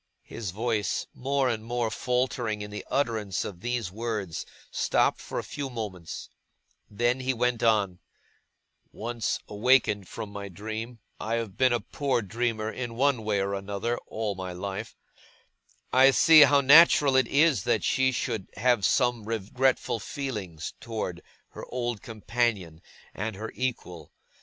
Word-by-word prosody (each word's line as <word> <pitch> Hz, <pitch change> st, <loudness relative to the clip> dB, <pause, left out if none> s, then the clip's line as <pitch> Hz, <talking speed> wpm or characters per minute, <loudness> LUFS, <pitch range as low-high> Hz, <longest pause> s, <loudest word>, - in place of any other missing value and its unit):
His 110 Hz, -4 st, -6 dB
voice, 105 Hz, +1 st, -1 dB
more 135 Hz, +1 st, 0 dB
and 110 Hz, -3 st, -1 dB
more 120 Hz, -1 st, -1 dB
faltering 125 Hz, -4 st, -1 dB
in 105 Hz, -, -8 dB
the 105 Hz, -, -6 dB
utterance 110 Hz, -8 st, -1 dB
of 90 Hz, -4 st, -7 dB
these 120 Hz, -5 st, -2 dB
words, 105 Hz, -5 st, -4 dB, 0.2 s
stopped -, -, +1 dB
for -, -, -6 dB
a -, -, -1 dB
few 140 Hz, -2 st, -5 dB
moments; 105 Hz, -9 st, -6 dB, 0.6 s
then 120 Hz, +4 st, +1 dB
he 130 Hz, 0 st, -1 dB
went 120 Hz, 0 st, 0 dB
on: 100 Hz, -6 st, +2 dB, 0.9 s
'Once 115 Hz, +1 st, -2 dB
awakened 105 Hz, -3 st, +2 dB
from 105 Hz, -, -7 dB
my 100 Hz, -1 st, -6 dB
dream 110 Hz, +5 st, -6 dB, 0.2 s
I 115 Hz, +2 st, -1 dB
have 115 Hz, -5 st, -3 dB
been 130 Hz, -1 st, +3 dB
a 120 Hz, -, +2 dB
poor 130 Hz, -4 st, -1 dB
dreamer, 110 Hz, +1 st, -2 dB
in 120 Hz, -2 st, -5 dB
one 130 Hz, -2 st, +2 dB
way 105 Hz, -2 st, +1 dB
or 100 Hz, +1 st, -1 dB
other, 100 Hz, +4 st, -2 dB
all 110 Hz, -2 st, -2 dB
my 95 Hz, -1 st, -6 dB
life 95 Hz, +2 st, -5 dB, 1.0 s
I 130 Hz, +1 st, +7 dB
see 155 Hz, +4 st, +7 dB
how 145 Hz, 0 st, +7 dB
natural 145 Hz, -1 st, +7 dB
it 130 Hz, -2 st, +4 dB
is 150 Hz, +1 st, +3 dB
that 120 Hz, -, +1 dB
she 130 Hz, 0 st, +2 dB
should 110 Hz, -5 st, -3 dB
have 120 Hz, 0 st, +2 dB
some 120 Hz, +1 st, +2 dB
regretful 115 Hz, +3 st, 0 dB
feeling 105 Hz, -, -5 dB, 0.2 s
towards 105 Hz, -6 st, -4 dB, 0.3 s
her -, -, -10 dB
old 120 Hz, -3 st, -3 dB
companion 110 Hz, -7 st, -2 dB, 0.3 s
and 105 Hz, +1 st, -4 dB
her 110 Hz, +3 st, -6 dB
equal. 115 Hz, -9 st, -4 dB
115 Hz, 145 wpm, -27 LUFS, 105-125 Hz, 1.0 s, I